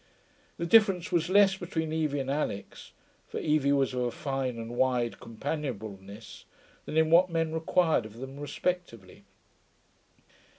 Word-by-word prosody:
The 170 - -2
difference 190 -2 +4
was 170 0 +1
less 195 0 +5
between 160 -4 -3
Evie 150 -3 0
and 135 0 -3
Alix 140 -9 -4 0.4
(for - - -5
Evie 150 -2 +2
was 135 -2 +2
of 125 - -1
a 120 - 0
fine 135 -1 -3
and 115 0 -6
wide 125 -2 +1
companionableness) 110 -6 -6 0.4
than 155 - -4
in 160 0 +3
what 180 +2 +6
men 165 -1 -1
required 160 -6 +1
of 110 +1 -15
them 135 +3 -8
respectively. 145 - -4
145 Hz, 140 wpm, -29 LUFS, 120-165 Hz, 0.4 s, what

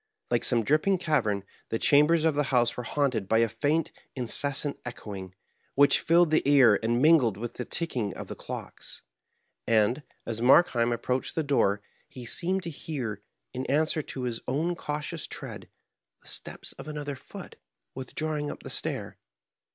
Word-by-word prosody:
Like - - +2
some 120 -3 +2
dripping 155 - +3
cavera, 125 - 0 0.3
the 115 - 0
chambers 150 +6 +4
of 160 -1 +3
the 145 0 +1
house 120 -2 +3
were - - -3
haunted 125 -5 0
by 110 - +4
a 115 0 +4
faint, 150 +7 0 0.2
incessant 140 +3 -2
echoing, 100 -6 -7 0.4
which 140 +1 +5
filled 170 -1 +4
the 155 - +4
ear, 130 -7 +6
and 120 +2 +1
mingled 145 -11 +5
with 120 +2 -5
the 125 - -5
ticking 125 - -2
of - - -6
the - - -6
clocks. - - -8 0.6
And, 110 +5 +3 0.2
as 115 0 -3
Markheim 120 -3 +5
approached 125 +2 -1
the 160 - +1
door, 105 -8 +2 0.3
he 125 -2 -9
seemed 185 +9 -1
to 170 - -4
hear, 125 -9 -5 0.3
in 130 - -3
answer 155 +2 +1
to 135 -3 -6
his 120 -2 -2
own 160 +7 0
cautious 150 0 -4
tread, - - -7 0.5
the - - -17
steps - - -6
of - - -8
another 145 -2 -4
foot - - -11 0.4
withdrawing 150 +3 -3
up - - -8
the - - -7
stair. - - -4
135 Hz, 165 wpm, -28 LUFS, 115-155 Hz, 0.6 s, ear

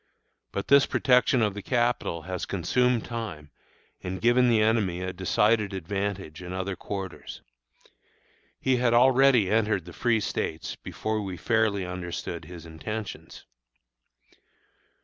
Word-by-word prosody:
But 100 - -4
this 140 0 +6
protection 125 -1 +3
of 105 -2 +1
the 105 - -6
Capital 120 -8 0
has 90 +2 -4
consumed 120 +6 +1
time 95 - -6 0.5
and 95 0 -4
given 120 +3 +4
the 115 -2 +4
enemy 105 -5 +1
a 95 0 -3
decided 105 +3 +1
advantage 95 -2 -4
in 90 0 -7
other 95 +1 -3
quarters. 95 0 -7 1.2
He 130 -1 +2
had 120 -1 +2
already 130 -4 +5
entered 105 -5 +1
the 85 - -10
Free 120 +2 +1
States 80 -5 -3
before 110 0 -3
we 95 -3 -5
fairly 110 -2 +1
understood 90 -1 -5
his 85 -2 -10
intentions. 100 +6 -7
100 Hz, 130 wpm, -27 LUFS, 90-115 Hz, 1.2 s, this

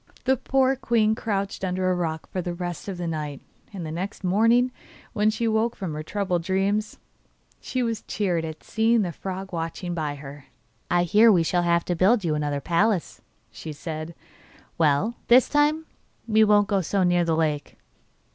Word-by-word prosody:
The 265 0 +3
poor 265 +1 +1
queen 225 -4 +2
crouched 200 -4 -3
under 185 0 0
a - - +1
rock 160 -3 -3
for 185 - -2
the 175 0 -4
rest 175 0 -5
of 195 -2 -4
the 175 - -4
night, 150 -4 -4 0.3
and 190 -5 -6
the 155 - -5
next 185 +5 -5
morning, 230 +7 +3 0.4
when 210 0 +2
she 230 +2 -1
woke 225 +2 +1
from 185 -6 -5
her 150 - -4
troubled 180 +1 -1
dreams, 195 +4 -1 0.6
she 255 -2 -2
was 230 -2 -2
cheered 180 -6 -1
at 160 -1 -7
seeing 225 0 +2
the 175 - -2
frog 190 +3 -6
watching 170 +2 -4
by 155 -4 -2
her. 140 0 -10 0.4
'I 175 0 +3
hear 210 +6 +5
we 175 -5 +4
shall 175 +2 +1
have 170 0 +1
to 175 - -1
build 200 +6 +3
you 160 - +1
another 145 -1 -1
palace,' 175 +5 0 0.3
said 155 +1 -7
she. - - -27
'Well, 160 +9 +2
this 245 +1 +6
time 300 +2 +2 0.4
we 220 -1 +4
won't 205 -1 +4
go 200 -3 +1
so 190 +3 0
near 175 -1 +3
the 165 -1 +1
lake. 150 -3 -1
185 Hz, 185 wpm, -25 LUFS, 165-215 Hz, 0.6 s, this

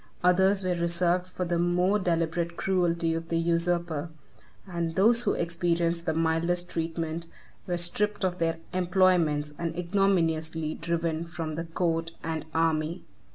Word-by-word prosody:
Others 190 +2 +4
were 185 -1 +1
reserved 175 +1 0
for 185 0 -4
the 170 0 0
more 180 +4 +2
deliberate 170 -1 -1
cruelty 170 -3 +1
of 165 0 -4
the 165 - +1
usurper; 170 -1 0 0.6
and 170 -3 -3
those 230 +5 +4
who - - +2
experienced 170 0 0
the 160 - +2
mildest 165 +2 0
treatment, 165 0 -3 0.4
were 175 -1 0
stripped 205 +4 0
of 180 -1 -1
their 165 0 +1 0.2
employments, 175 -5 +2
and 165 -1 -3
ignominiously 165 -4 +1
driven 165 -1 -2
from 165 -2 -5
the 165 +2 -4
court 165 0 -1
and 160 -2 -3
army. 160 +1 0
170 Hz, 140 wpm, -28 LUFS, 165-180 Hz, 0.6 s, Others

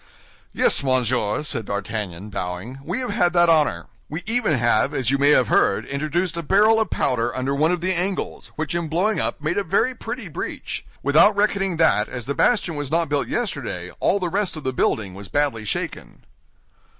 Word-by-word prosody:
"Yes, - - +2
monsieur," 130 -3 0
said 125 -7 -2
D'Artagnan, 100 -1 -4
bowing, 95 +7 -5
"we 180 - -2
have 250 - -3
had 175 -5 +2
that 175 -1 +4
honor. 150 - +2 0.2
We 160 +4 -5
even 220 - +1
have, 120 +4 +2
as 130 -2 0
you 140 - +1
may 140 +1 +4
have 130 -5 +4
heard, 100 - +2
introduced 155 +5 -2
a 170 - -3
barrel 210 +7 +4
of 220 -4 0
powder 120 -1 0
under 130 +2 -1
one 155 +4 +2
of 180 -1 -1
the 185 +2 +1
angles, 185 +2 -2
which 155 -1 -3
in 170 -1 -2
blowing 185 +8 0
up - - -2
made 170 +6 0
a - - -1
very 225 +7 +1
pretty 235 -2 -6
breach. 160 - -5 0.2
Without 155 +9 +5
reckoning 195 -3 +1
that 155 -10 +3
as 120 -2 -6
the 140 - -2
bastion 200 -1 +2
was 145 -2 -3
not 165 0 +1
built 145 -1 0
yesterday 135 - -3
all 200 - +2
the 180 - -1
rest 195 -2 -1
of 155 - -8
the 130 - -2
building 105 -5 0
was 100 +1 -9
badly 140 -6 0
shaken." 100 - -5
150 Hz, 200 wpm, -22 LUFS, 125-185 Hz, 0.2 s, Without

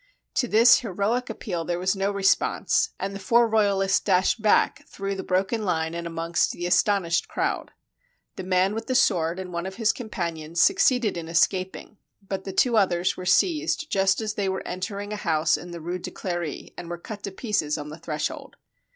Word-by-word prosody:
To 245 - +1
this 230 +3 +6
heroic 225 +3 -1
appeal 175 -6 -4
there 175 +1 -2
was 185 +2 0
no 195 +1 0
response, 200 -1 +2
and 195 +1 -3
the 195 - -6
four 235 +4 +3
royalists 200 -3 +2
dashed 190 +3 +2
back 215 -1 +2
through 195 0 -4
the 195 - -4
broken 195 +5 0
line 160 -4 -1
and 170 0 -4
amongst 165 0 0
the 175 - -5
astonished 175 -2 +2
crowd. - - -2 0.7
The - - -5
man 185 +1 +1
with 225 +1 -5
the 255 - -1
sword 170 -8 +2
and 185 -1 -7
one 170 +2 -3
of 190 - -7
his 220 0 +2
companions 170 -8 -4
succeeded 250 - +3
in 165 -1 -5
escap 185 +3 +1
ing, 215 - -12 0.2
but 195 -1 -6
the 195 - -4
two 235 +4 +2
others 180 -3 +2
were 185 - -7
seized 315 - +1
just 195 +2 +2
as 215 -1 -2
they 200 -2 -1
were 190 - -3
entering 200 +3 -4
a - - -3
house 160 -4 +1
in 175 - -8
the 170 -1 -7
Rue 175 +3 -4
de - - -6
Clery, 175 -5 -5
and 170 - -8
were 175 - -4
cut 205 +4 -8
to 200 - -5
pieces 190 -8 -1
on 150 0 -6
the 155 +2 -9
threshold. 155 -2 -4
190 Hz, 200 wpm, -25 LUFS, 175-210 Hz, 0.7 s, this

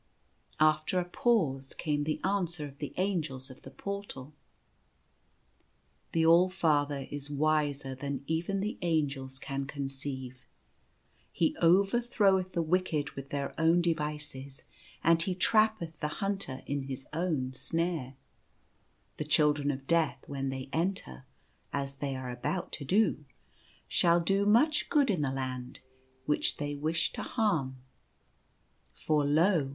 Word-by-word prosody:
After 155 +3 +3
a 180 - -1
pause 160 - +1
came 145 -1 -1
the 155 - -1
answer 175 -5 -1
of 140 -1 -11
the 145 - -4
Angels 155 -9 -2
of 130 - -14
the - - -10
Portal: 200 -6 -6 0.8
" - - -41
The 165 -1 +3
All 170 +3 +6
Father 145 -6 +1
is 145 0 -6
wiser 145 -2 +1
than 140 0 -4
even 170 +5 -1
the 210 +2 -3
Angels 140 -6 -1
can 135 0 -4
con 140 -1 -4
ceive. 130 -2 -6 0.9
He 165 - +1
overthroweth 195 +1 +3
the 170 - +1
wicked 160 -3 0
with 135 0 -8
their 140 -1 -3
own 165 +2 +5
de 170 -1 +3
vices, 150 -3 -6 0.4
and 165 0 +5
he 180 +2 -1
trappeth 215 -5 +2
the 150 - -1
hunter 195 -10 -2
in 140 -1 -2
his 135 -1 -6
own 155 -6 -1
snare. 165 -2 -2 1.0
The - - -2
Children 150 -1 +3
of 135 -1 -3
Death 165 0 +1
when 135 -1 -3
they 130 0 -5
enter 165 - -2 0.2
— - - -39
as 140 -1 -3
they 140 -1 -2
are 130 -1 -5
about 150 +9 -3
to 145 - -4
do 185 -1 +2 0.3
— - - -32 0.3
shall 170 0 +4
do 195 +4 +1
much 295 +9 +4
good 285 -6 +4
in 180 -6 0
the 140 -2 0
Land, 130 -2 -4 0.4
which 150 - +1
they 145 0 -3
wish 155 +3 -1
to - - -4
harm. 160 - 0 1.2
For 150 -2 +1
lo 155 0 +3
150 Hz, 145 wpm, -30 LUFS, 135-180 Hz, 1.2 s, All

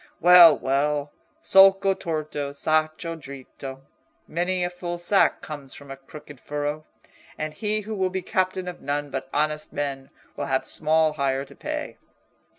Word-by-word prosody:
Well, 175 -2 +8
well, 145 +2 -1 0.3
solco 195 0 +6
torto, 155 -5 -4
sacco 155 +3 0
dritto—many 140 +5 -6
a 175 - 0
full 175 -1 -5
sack 175 +3 +2
comes 145 -3 -8
from 140 -1 -12
a - - -5
crooked 145 0 -13
furrow; 150 +2 -4 0.5
and 155 0 -4
he 215 +2 -2
who 215 +2 -6
will 190 -3 0
be 190 0 -4
captain 185 0 -1
of 180 - -7
none 145 0 -3
but 135 0 -5
honest 150 +1 -1
men 135 -2 -4 0.3
will 145 - -3
have 130 -1 0
small 155 0 +2
hire 135 -2 -1
to - - -16
pay." - - -5
155 Hz, 150 wpm, -24 LUFS, 140-175 Hz, 0.5 s, Well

